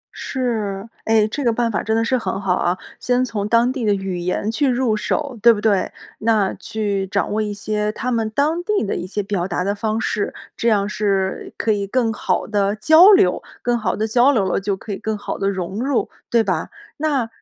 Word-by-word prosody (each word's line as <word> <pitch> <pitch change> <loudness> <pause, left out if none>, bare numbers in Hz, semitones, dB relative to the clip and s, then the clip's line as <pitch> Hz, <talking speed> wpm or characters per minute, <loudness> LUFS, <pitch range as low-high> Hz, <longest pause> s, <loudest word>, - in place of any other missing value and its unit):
是， 220 -6 -3 0.2
诶， 220 -1 +3
这 280 +6 -4
个 235 - +3
办 230 0 0
法 210 - -1
真 220 +1 0
的 225 - +1
是 255 - +1
很 190 -2 -3
好 195 -2 +1
啊， 180 0 0 0.2
先 250 +1 +1
从 210 -4 -3
当 235 +2 +4
地 260 -4 -4
的 205 -2 +3
语 190 -2 -4
言 180 +4 -1
去 270 +5 +1
入 245 -3 +1
手， 260 +3 -2
对 235 - +8
不 215 - 0
对？ 205 -3 +1 0.3
那 215 -3 +2
去 200 -3 -3
掌 200 +2 -1
握 215 +1 0
一 210 - -2
些 210 +1 -2
他 250 +3 -3
们 225 -2 0
当 305 +9 0
地 415 - 0
的 - - -2
一 180 - -4
些 205 +1 -3
表 195 -3 -2
达 180 0 -1
的 200 +2 0
方 215 +1 -2
式， 210 -2 -1 0.2
这 235 - +1
样 200 -2 +2
是 195 -2 -1
可 220 - +1
以 200 -1 -1
更 235 0 +1
好 - - -1
地 205 -1 0
交 315 - +7
流。 395 -1 +4 0.2
更 240 0 +1
好 215 -5 -1
地 220 +1 -1
交 245 +5 +4
流 210 -8 +2
了， 190 - 0
就 195 0 -2
可 210 +2 -8
以 - - -4
更 220 -1 -3
好 - - -5
地 195 0 +1
融 190 +2 -4
入， 270 -3 0 0.2
对 230 -1 +3
吧？ - - -1 0.3
那 285 -6 0
215 Hz, 240 characters per minute, -20 LUFS, 200-240 Hz, 0.3 s, 对